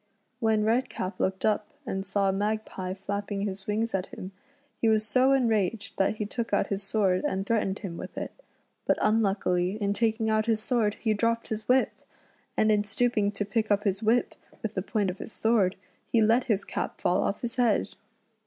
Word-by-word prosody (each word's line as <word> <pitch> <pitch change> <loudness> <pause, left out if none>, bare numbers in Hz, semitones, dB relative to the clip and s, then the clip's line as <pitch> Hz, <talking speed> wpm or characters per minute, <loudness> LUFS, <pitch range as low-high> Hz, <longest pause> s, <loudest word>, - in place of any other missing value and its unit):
When 220 -2 +2
Redcap 220 -4 -1
looked 190 0 0
up 215 -1 +1 0.2
and 195 -5 -2
saw 195 -1 +1
Magpie 200 -2 -2
flapping 200 +1 -3
his 195 -1 -4
wings 220 +2 0
at 190 -1 -1
him, 185 - -8 0.5
he 225 - +4
was 215 -1 +3
so 255 +4 +3
enraged 225 -5 +1
that 195 +2 +2
he 215 - -3
took 230 +2 -4
out 200 -1 +1
his 200 0 -1
sword 195 -2 +1
and 190 0 -1
threatened 205 -3 0
him 180 -5 -6
with - - -8
it; - - -3 0.6
but - - +3
unluckily 195 -4 +2
in 200 -1 +1
taking 220 +1 +1
out 215 0 +2
his 225 -2 +2
sword 220 -2 +1
he 220 -2 0
dropped 230 +2 0
his 220 0 -4
whip, 255 +1 +4 0.7
and 215 - +4
in 210 -1 +3
stooping 215 -1 +1
to 205 - -2
pick 220 +1 -1
up 205 0 +2
his 195 -1 0
whip 225 +3 +2 0.3
with 220 -1 -2
the 190 - -1
point 200 -1 0
of 185 - -11
his - - -7
sword, 215 -5 +2 0.4
he 230 - +4
let 225 +3 +4
his 210 -5 0
cap - - -4
fall 180 - +2
off 200 - -1
his 240 +1 -3
head. 240 -4 +2
210 Hz, 195 wpm, -28 LUFS, 195-225 Hz, 0.7 s, he